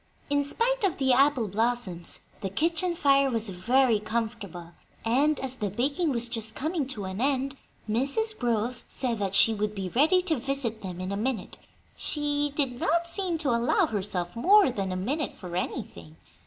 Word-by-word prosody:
In 285 0 +3
spite 475 - 0
of 385 -4 +1
the 265 -2 +3
apple 270 -3 +3
blossoms, 210 -4 -1 0.2
the 195 - -2
kitchen 330 - +1
fire 275 -3 +4
was 225 -3 -1
very 230 +5 +2
comfortable; 215 -6 -4 0.3
and, 280 +6 +3
as 260 -1 -3
the 205 - -2
baking 280 - 0
was 240 -3 +2
just 225 -2 -2
coming 310 -1 -1
to 215 -7 -4
an 190 +3 -4
end, 275 0 0 0.3
Mrs. 280 - 0
Grove 240 - -1
said 240 -4 -2
that 195 -1 -1
"she 225 - +6
would 210 0 -2
be 190 -2 -3
ready 320 - +3
to 330 -5 0
visit 270 -2 -1
with 220 - -20
them 185 -2 -6
in 185 +1 -4
a 200 - -2
minute:" 225 -2 -3 0.4
she 290 -1 -1
did 260 -5 0
not 340 +2 +1
seem 345 0 -1
to 300 -5 0
allow 235 +1 +2
herself 190 -3 -2
more 385 - +5
than 195 -4 -3
a - - -2
"minute" 270 - -2
for 175 -2 -8
anything. 85 - -5
245 Hz, 180 wpm, -27 LUFS, 210-290 Hz, 0.4 s, she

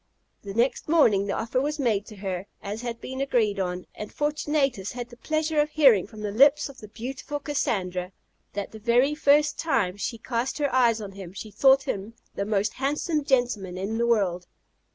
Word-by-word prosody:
The 200 -1 -8
next 245 +5 +1
morning 215 -12 +4
the 200 - -1
offer 235 +3 -1
was 295 +2 -1
made 220 -7 0
to 215 - -10
her, 190 -1 -4 0.2
as 205 +3 -4
had 235 -1 -5
been 260 +1 -5
agreed 225 -7 +1
on, 180 -1 -2
and 210 - -7
Fortunatus 295 -8 -1
had 245 -1 -6
the 240 - -12
pleasure 310 +3 -1
of 300 - -1
hearing 270 - +5
from 215 -2 -11
the 210 -1 -3
lips 280 +7 +5
of 265 -2 -13
the 215 - -10
beautiful 265 +6 -6
Cassandra, 185 -11 -2 0.4
that 200 -1 -4
the 220 - -10
very 245 +6 +3
first 300 0 +3
time 230 - 0
she 230 +3 -3
cast 240 +2 -2
her 290 -3 -1
eyes 235 -3 +3
on 200 -2 -6
him 190 -2 -9
she 210 +2 -8
thought 265 +6 +5
him 205 +1 -4 0.2
the 200 - -2
most 205 0 0
handsome 295 +3 -1
gentleman 240 -9 0
in 205 +4 -3
the 235 - +2
world. 185 -6 +1
235 Hz, 195 wpm, -26 LUFS, 200-275 Hz, 0.4 s, hearing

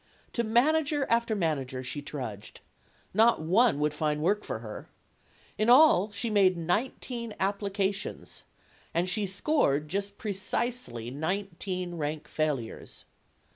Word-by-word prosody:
To 235 - 0
manager 290 +5 +2
after 235 -1 +2
manager 135 -8 -1
she 125 +3 -4
trudged. 125 -8 -7 0.5
Not 225 +4 +5
one 185 +3 +3
would 150 0 +1
find 150 0 -1
work 200 +7 +1
for - - -4
her. 110 -1 -9 0.7
In 215 +2 +2
all, 250 - +7
she 205 +4 -2
made 190 -3 +4
nineteen 230 +6 -2
applications. 200 0 -2 0.5
And 175 +2 +2
she 200 +2 0
scored 185 - +1
just 200 +2 -3
precisely 200 - -2
nineteen 180 +3 -3
rank 150 0 -3
failures. 145 -7 -3
190 Hz, 120 wpm, -29 LUFS, 150-220 Hz, 0.7 s, all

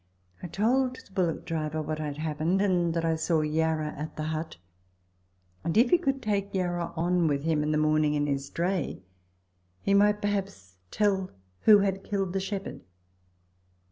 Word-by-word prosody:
I - - -5
told 250 +8 +1
the 260 - -15
bullftck 175 -4 -1
driver 155 -1 -2
what 155 0 -3
had 150 -2 -4
happened, 155 +4 0
and 180 -4 +2
that 165 0 0
I 165 0 +2
saw 160 0 +1
Yarra 155 0 0
at 150 +2 -6
the 155 - -4
hut, 160 - -5 1.1
and 170 +4 -1
if 240 +2 +5
he 355 - +6
could 270 -5 -1
take 200 -2 -1
Yarra 175 -2 -1
on 175 0 +2
with 140 -2 0
him 160 -2 +1
in 150 +1 0
the 155 - +2
morning 155 0 +2
in 145 0 +1
his 140 -1 -2
dray, 175 - -2 0.8
he 200 - 0
might 205 +1 +4
perhaps 195 - -3
tell 195 -3 +1 0.4
who 210 -2 +8
had 195 -1 -1
killed 195 -3 -2
the 195 - 0
shepherd. 195 0 -5
170 Hz, 175 wpm, -28 LUFS, 155-200 Hz, 1.1 s, who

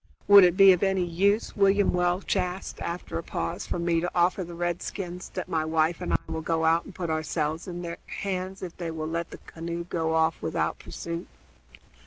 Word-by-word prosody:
"Would 200 -1 +10
it 180 0 +4
be 195 -1 +9
of 180 - -1
any 190 -2 +2
use," 200 +6 +1
William 200 0 +3
Welch 180 +2 +1
asked, 185 0 -3
after 170 -1 -4
a - - -6
pause, - - -4
"for - - -2
me 170 -1 +1
to 175 - -1
offer 180 +2 +2
the 170 0 -8
redskins 175 +1 -4
that - - -3
my 160 -1 0
wife 160 +1 +1
and - - -3
I - - +4
will 160 - -4
go 160 0 0
out 165 +1 +3
and 195 - -12
put 170 -3 -3
ourselves 155 +1 -2
in 175 -1 -5
their 170 0 -5
hands 190 -1 -4
if 175 -2 -6
they 170 -2 -4
will 160 -1 -4
let 165 +1 -3
the - - -9
canoe 170 +1 -6
go 160 -2 -1
off 160 0 +2
without - - -1
pursuit?" 170 +1 -6
175 Hz, 210 wpm, -27 LUFS, 165-185 Hz, -, Would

